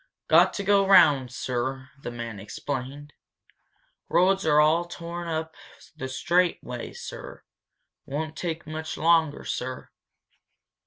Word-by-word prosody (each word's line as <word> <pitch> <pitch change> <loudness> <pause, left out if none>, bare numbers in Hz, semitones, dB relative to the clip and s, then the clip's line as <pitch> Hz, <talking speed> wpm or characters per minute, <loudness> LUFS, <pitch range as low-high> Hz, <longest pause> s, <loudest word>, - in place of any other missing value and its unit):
"Got - - +5
to 200 - -3
go 200 0 +3
round, 145 -10 +6
sir," 130 +2 -3
the - - -5
man 115 -3 -6
explained. 135 +7 -6 1.0
"Roads 190 0 +3
are 150 -1 +5
all 160 +3 +4
torn 175 0 -7
up 160 0 -3 0.4
the 130 -4 -5
straight 175 +6 +2
way, 125 -1 -6
sir. - - -9 0.6
Won't 155 +3 -4
take 170 -1 -4
much 155 +1 -5
longer, 160 -2 +2
sir." 130 +1 -5
155 Hz, 120 wpm, -26 LUFS, 130-170 Hz, 1.0 s, round